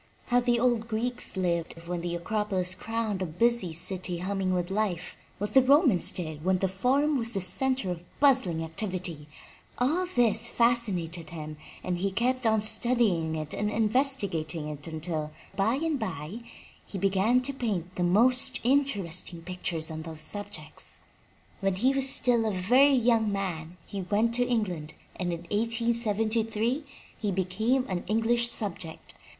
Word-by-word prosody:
How 245 0 +4
the 240 -1 +1
old 235 -2 +1
Greeks 235 -1 -4
lived 170 -3 -1
when 175 -1 -3
the 175 0 -3
Acropolis 190 0 -2
crowned 220 0 -3
a - - 0
busy 200 +2 +1
city 180 +2 0
hum 195 +3 -3
ming 185 -1 0
with 180 0 -2
life, 195 -4 -2 0.2
what 205 +1 -4
the 265 - +7
Romans 265 - +4
did 155 -4 -5
when 185 +1 +2
the 190 - -1
Fomm 265 +10 +1
was 230 -1 +3
a 195 - -1
center 255 +2 +4
of 175 -1 -6 0.2
bustling 245 - +4
activity 170 -2 -4 0.3
— - - -27
all 315 +9 0
this 245 - +3
fascinated 195 -9 +1
him 155 -2 -8 0.3
and 180 -1 -3
he 195 +2 0
kept 245 +4 0
on 220 -1 +2
study 235 +2 +4
ing 160 -3 -2
it 155 -1 -5
and 210 0 -2
investigating 210 - +1
it 145 0 -6
until, 160 -1 -4 0.3
by 210 +5 +1
and 310 0 -2
by, 180 - -5 0.4
he 200 - -8
began 195 +6 +2
to 280 +2 -1
paint 190 -9 -4
the - - -4
most 235 +8 +5
interesting 200 - 0
pictures 170 -3 -2
on 160 0 -6
those 160 -1 -2
subjects. 190 -4 -4 0.6
When 195 -2 0
he 255 +8 +2
was 270 0 +1
still 235 -4 +2
a - - 0
very 250 +10 +4
young 230 -3 +2
man 180 -4 -4
he 200 - -6
went 210 +5 0
to 245 +1 +3
England 180 -10 -2 0.2
and 180 -1 -2
in 170 -1 -5
1873 225 - 0 0.4
he 210 -2 -1
became 220 +8 0
a 185 - -2
British 225 +5 +2
subject. 185 -8 -1
205 Hz, 160 wpm, -27 LUFS, 175-235 Hz, 0.6 s, the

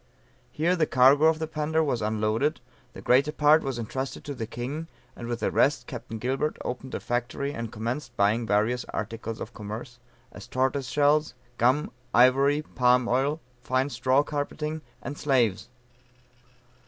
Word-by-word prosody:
Here 170 +4 +1
the 160 -4 +1
cargo 135 +4 +5
of 160 0 +4
the 160 - -2
Panda 160 +1 0
was 130 -6 -1
unloaded, 110 +6 0 0.3
the - - -10
greater 135 +4 +4
part 150 +1 +4
was 135 -3 -3
entrusted 130 +4 -4
to 145 - -5
the 115 -4 -5
king, 135 +8 -5 0.3
and 120 - -7
with 120 -1 -3
the - - 0
rest 145 - +2
Capt. 115 -4 -7
Gilbert 135 +6 -1
opened 125 +1 -5
a - - -2
factory 125 +4 -2
and 115 -4 -5
commenced 120 +3 -4
buying 110 +3 +2
various 110 +4 +1
articles 115 +1 -5
of - - -7
commerce, 110 +4 -7 0.3
as - - -11
tortoise 130 +1 0
shell, 150 +2 +3 0.4
gum, 130 +6 +2 0.2
ivory, 135 +5 +5
palm 125 -3 +2
oil, 140 +6 +1 0.2
fine 130 +3 0
straw 130 +2 +2
carpeting, 150 +1 -3 0.2
and 145 - -6
slaves. 120 -8 +1
130 Hz, 155 wpm, -27 LUFS, 120-145 Hz, 0.4 s, cargo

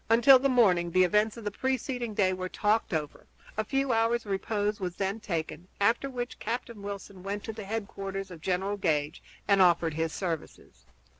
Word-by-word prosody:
Until 240 +4 +7
the 275 +2 +2
morning 190 -9 +4
the 185 +2 +4
events 210 +5 +2
of 230 - -8
the 205 - -2
preceding 245 -1 -2
day 185 -2 +3
were 185 0 -4
talked 215 +4 +1
over; 155 -4 -4 0.3
a 215 - 0
few 270 +2 0
hours' 230 +1 +1
repose 205 +1 -1
was 180 -2 -4
then 195 +2 -2
taken, 170 -2 -4
after 230 +7 +2
which 245 -2 -5
Captain 235 -1 -4
Wilson 200 -1 -7
went 200 +2 -4
to 220 - -5
the 215 -2 -7
headquarters 195 -2 -4
of 165 -3 -10
General 190 +3 -1
Gage 155 -4 0 0.3
and 200 -1 +5
offered 170 -3 +4
his 160 +1 -1
services. 160 - -6
200 Hz, 180 wpm, -29 LUFS, 180-225 Hz, 0.3 s, Until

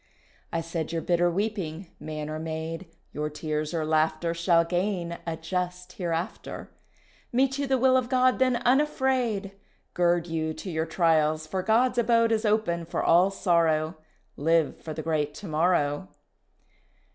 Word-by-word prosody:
I 165 - -1
said 165 -1 -4
your 165 -1 -2
bitter 175 0 +2
weeping 190 -3 -3
man 155 0 -5
or 155 0 -4
maid, 160 +2 -5 0.2
Your 150 +1 -3
tears 150 0 -3
or 165 -3 -1
laughter 160 +2 +1
Shall 170 0 +3
gain 175 -1 -2
a 165 -1 -2
just 180 +2 -4
Hereafter; 170 -1 -4 0.6
Meet 270 +2 +1
you 280 - -1
the 265 0 +2
will 260 +1 +4
of 255 -1 +1
God 255 -1 +3
then 255 -1 +3
unafraid, 250 -5 +1 0.4
Gird 175 -1 +2
you 160 -2 -2
to 180 +4 -6
your 160 0 -1
trials 155 -2 +2
for 185 +4 -2
God's 240 +5 +2
abode 230 -1 +3
Is 225 0 +1
open 210 -6 +1
for 165 - -3
all 175 +3 +5
sorrow; 165 -4 +1 0.4
Live 165 +1 +1
for 155 -1 -6
the 155 - -5
great 150 -2 -1
to 195 - -8
morrow. 155 0 +1
170 Hz, 155 wpm, -27 LUFS, 160-210 Hz, 0.6 s, all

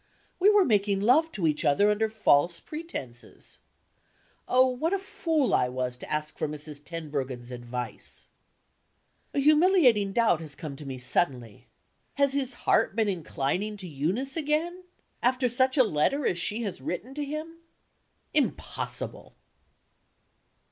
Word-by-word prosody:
We 385 +3 +6
were 415 -2 +5
making 200 -3 +2
love 295 +10 +4
to 185 - -1
each 150 -1 +1
other 205 +9 +4
under 220 +1 +1
false 170 -6 +3
pretenses. 300 - -9 0.9
Oh, 255 +1 +5
what 260 +8 -1
a - - +3
fool 325 - -1
I 125 - +3
was 125 0 -3
to - - -9
ask 150 0 -3
for - - 0
Mrs. 150 -1 -7
Tenbruggen's 140 -7 -5
advice! 125 0 -6 1.1
A - - +2
humiliating 300 - +4
doubt 220 -6 +2
has 150 -3 -9
come 140 0 -7
to 145 - -9
me 130 -1 -5
suddenly. 125 - -1 0.5
Has 280 -1 +3
his 270 -3 0
heart - - +3
been 220 -2 +2
inclining 185 +4 -2
to 190 -2 -5
Eunice 180 - -2
again? 330 +4 -1 0.4
After 255 +1 +2
such 260 +3 +2
a 260 - +7
letter 230 - +1
as 175 - +1
she 210 +6 -1
has 200 -4 -5
written 235 +9 -5
to 295 +1 -3
him? 310 +3 -6 0.8
Impossible! - - -2
210 Hz, 140 wpm, -27 LUFS, -, 1.1 s, a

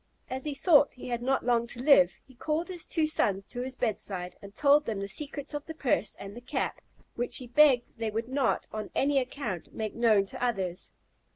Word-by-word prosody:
As 260 +2 -3
he 295 -2 -2
thought 290 0 +4
he 250 - -8
had 240 -1 -2
not 265 +2 0
long 235 -1 +2
to 240 - -6
live, 250 -10 +5
he 260 - -18
called 310 +7 -2
his 355 -3 -3
two 320 -2 +1
sons 195 -10 +1
to 245 - -5
his 260 +1 -5
bedside, 190 -7 -2
and 200 +1 -12
told 290 +1 +4
them 215 -3 -2
the 195 - -3
secrets 285 +6 -3
of 295 0 -5
the 320 - -7
purse 245 -8 0
and 200 +1 -9
the 240 - -9
cap, 245 - -3 0.3
which 240 +1 0
he 255 - -2
begged 245 -2 +3
they 225 -1 -1
would 225 +2 -3
not, 265 +1 0
on 215 0 -4
any 280 0 +3
account, 250 - -5
make 215 -1 -3
known 220 -4 +3
to 195 - -7
others. 190 -7 -2
245 Hz, 215 wpm, -29 LUFS, 215-285 Hz, 0.3 s, live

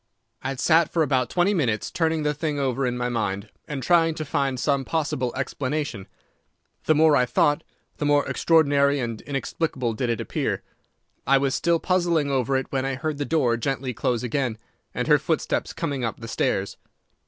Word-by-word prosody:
"I - - -4
had 135 -1 -4
sat 165 +1 +4
for 165 - +2
about 130 -4 +1
twenty 180 +3 +2
minutes 120 - 0
turning 160 -2 0
the 150 0 +1
thing 150 0 -2
over 135 -1 0
in 125 0 -2
my 125 0 -1
mind 105 -5 -2 0.2
and 145 -4 -4
trying 165 +1 +3
to 155 - -4
find 135 -2 -1
some 140 0 +1
possible 135 -5 -1
explanation. 130 -4 -3 0.8
The 155 - +4
more 155 0 +5
I 125 -2 +3
thought, 145 +5 +2 0.3
the 150 - -2
more 145 0 +3
extraordinary 145 -3 +3
and 115 -3 -3
inexplicable 135 -3 -2
did 120 +2 -2
it 115 - 0
appear. - - -2 0.6
I 135 +1 +6
was 135 -1 0
still 170 -1 +2
puzzling 170 -6 +1
over 135 0 +1
it 130 - -4
when 135 -1 0
I 135 0 -1
heard 150 +2 -3
the 145 - -1
door 130 -8 +2
gently 130 +1 -2
close 120 +2 -1
again, 125 -2 -1 0.3
and - - -3
her - - +5
footsteps - - -1
coming 140 -3 -3
up 115 - -3
the 115 - -8
stairs. 100 -3 -1
140 Hz, 190 wpm, -24 LUFS, 125-155 Hz, 0.8 s, I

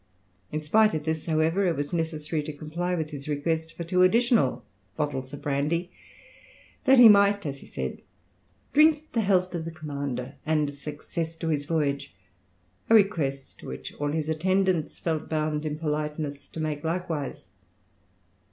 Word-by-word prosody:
In 155 - -1
spite 210 +6 +3
of 155 - -2
this, 160 0 -2
however, 160 +4 +2
it 170 - +1
was 145 +3 -3
necessary 160 -1 -1
to 150 +1 -6
comply 170 +5 -3
with 160 -2 -3
his 140 -1 -7
request 160 +2 -2
for 170 - -3
two 180 +2 +1
additional 235 +5 +3 0.3
bottles 135 -4 -2
of 145 - -9
brandy, 150 +5 0 0.9
that 265 -1 +6
he 245 -2 +11
might, 200 -2 +5
as 140 -2 -4
he - - -14
said, 65 -1 -5 0.7
drink 310 +1 +4
the 230 - +2
health 185 -3 +2
of 170 -2 -3
the 165 - -4
commander 140 -5 -5
and 150 -2 +1
success 155 +3 -5
to 165 0 -3
his 145 -2 0
voyage, 145 - -1 0.7
a 225 - +7
request 155 -11 +1
which 65 - -7
all 145 0 0
his 155 0 -1
attendants 185 +1 +1
felt 160 -2 -2
bound 155 -1 -1
in 150 0 -3
politeness 150 -2 -3
to - - -9
make 155 -2 -2
likewise. 165 -4 -3
155 Hz, 160 wpm, -27 LUFS, 145-175 Hz, 0.9 s, he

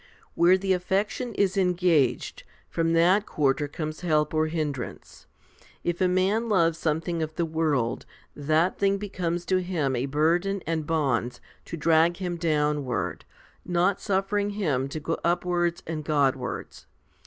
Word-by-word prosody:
Where 175 +2 +5
the 190 0 +1
affection 200 +6 -1
is 200 -1 +1
engaged, 175 -9 +1 0.3
from 165 0 0
that 180 +5 +4
quarter 145 0 +1
comes 155 +1 -5
help 155 -4 +1
or 155 0 +2
hindrance. 150 -5 -5 0.6
If 175 +1 -2
a 185 - +4
man 195 +6 +1
loves 165 -5 +2
some 160 0 0
thing 170 -1 -3
of 155 0 -4
the 170 - 0
world, 155 -7 -1 0.3
that 155 +5 +1
thing 200 0 +2
becomes 175 -4 -3
to 185 - +2
him 160 -8 -1
a 125 +3 -1
burden 175 +7 +1
and 160 -2 -2
bonds 125 -6 0 0.3
to 170 - -6
drag 165 +2 +3
him 180 -2 -3
downward, 150 -5 -1 0.4
not 180 +2 +1
suffering 200 +1 0
him 140 -10 0
to 155 - -5
go 165 +2 -3
up 175 +1 +1
wards 175 -1 0
and 155 -1 -4
Godwards. 135 -4 -1
165 Hz, 150 wpm, -26 LUFS, 150-185 Hz, 0.6 s, Where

